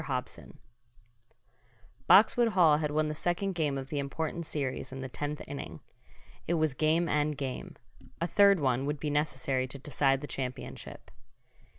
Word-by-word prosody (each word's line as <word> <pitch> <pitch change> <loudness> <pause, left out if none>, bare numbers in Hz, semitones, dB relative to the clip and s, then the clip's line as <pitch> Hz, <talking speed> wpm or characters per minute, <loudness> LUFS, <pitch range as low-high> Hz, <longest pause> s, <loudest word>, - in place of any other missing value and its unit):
HOBSON 130 -3 -5 1.5
Boxwood 230 +3 +6
Hall 160 -5 +5
had 150 -1 -1
won 155 +1 +1
the 150 - -2
second 175 +5 -1
game 150 -5 0
of 135 0 -6
the 150 -2 -2
important 160 +4 -3
series 135 -4 -3
in 135 0 -6
the 130 - -4
tenth 145 +3 -5
inning. 80 - -7 0.7
It 170 - +1
was 155 -3 +1
game 160 +5 +2
and 150 -1 0
game 135 -3 -5 0.4
a 170 - 0
third 200 +1 +5
one 135 -1 +1
would 145 0 -2
be 150 0 -2
necessary 135 -3 0
to 130 - -5
decide 135 -1 +1
the - - -5
championship. 130 -3 -6
150 Hz, 160 wpm, -30 LUFS, 135-160 Hz, 1.5 s, Boxwood